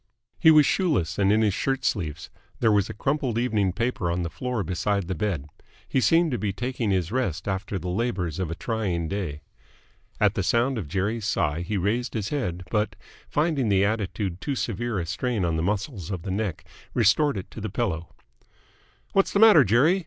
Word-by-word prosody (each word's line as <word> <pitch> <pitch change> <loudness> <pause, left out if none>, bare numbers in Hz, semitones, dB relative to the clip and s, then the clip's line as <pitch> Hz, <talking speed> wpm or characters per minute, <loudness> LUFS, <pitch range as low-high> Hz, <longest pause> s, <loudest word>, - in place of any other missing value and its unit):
He 160 - +6
was 155 -2 +7
shoeless 105 - +1
and 100 0 +4
in 110 +1 +4
his 105 -3 +2
shirt 135 +5 -1
sleeves. 80 -6 -2 0.3
There 115 - +3
was 100 -2 +2
a - - -5
crumpled 135 -1 -1
evening 110 -6 +1
paper 115 -2 -1
on 85 +1 -1
the 85 - -4
floor 125 +2 -2
beside 95 +2 -1
the 95 - -1
bed. 90 -6 -2 0.4
He 130 - +1
seemed 165 +3 +4
to 120 - -1
be 100 0 -1
taking 120 +1 -2
his 95 -2 0
rest 95 - -1
after 95 +1 -2
the 90 - -5
labours 95 -4 -1
of 90 -4 -2
a 85 - -3
trying 95 -7 -2
day. 85 -6 -4 0.8
At - - +4
the - - -1
sound 120 +1 +1
of 90 - -5
Jerry's 100 +6 -1
sigh 85 -6 0
he 100 +4 -2
raised 115 +7 -1
his 105 -2 -2
head, 90 - -2
but, 105 -2 0 0.3
finding 150 -6 +1
the 100 -1 +4
attitude 100 -3 -2
too 140 - -2
severe 120 -2 -2
a 85 - -1
strain 105 +3 -1
on 85 -1 0
the 80 - 0
muscles 100 - -2
of 95 -4 -4
the 95 - -4
neck, 100 -3 -3 0.3
restored 125 +4 +3
it 95 - -7
to 110 - -8
the 110 - -3
pillow. 90 -6 -2 1.0
"What's 195 - +3
the 200 - +3
matter, 215 -9 +8
Jerry? 130 - +4
105 Hz, 200 wpm, -25 LUFS, 90-125 Hz, 1.0 s, matter